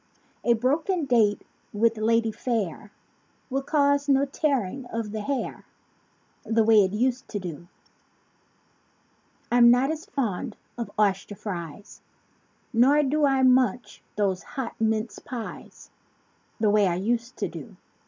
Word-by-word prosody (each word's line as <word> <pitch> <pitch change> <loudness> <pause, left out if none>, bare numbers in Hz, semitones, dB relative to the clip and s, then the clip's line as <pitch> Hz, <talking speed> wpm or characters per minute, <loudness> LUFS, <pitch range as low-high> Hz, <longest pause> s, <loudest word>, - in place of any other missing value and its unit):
A 235 - +4
broken 300 - 0
date 225 -5 +2 0.3
with 225 +2 +2
lady 225 +1 +2
fair 210 -4 -3 0.6
Will 270 +1 0
cause 285 0 +1
no 275 0 +4
tearing 270 - -1
of 230 -3 -4
the 215 0 -4
hair 270 +5 -3 0.8
The 225 0 +2
way 215 -2 +6
it 190 - -1
used 245 +4 -1
to 205 - -4
do. 175 -2 -7 1.8
I'm 240 0 +7
not 250 +4 +4
as 320 +4 -6
fond 235 - -3 0.2
of 235 -1 -5
oyster 205 -1 +1
fries; 180 -2 -7 0.7
Nor 270 +6 +5
do 295 +2 +2
I 270 -1 +2
munch 250 -2 +2
those 195 -3 0
hot 265 -4 -6
mince 220 -1 0
pies 240 -3 -9 0.7
The 215 -2 +3
way 210 -1 +4
I 175 - 0
used 235 +6 -2
to - - -1
do. - - -10
230 Hz, 135 wpm, -25 LUFS, 210-270 Hz, 1.8 s, I'm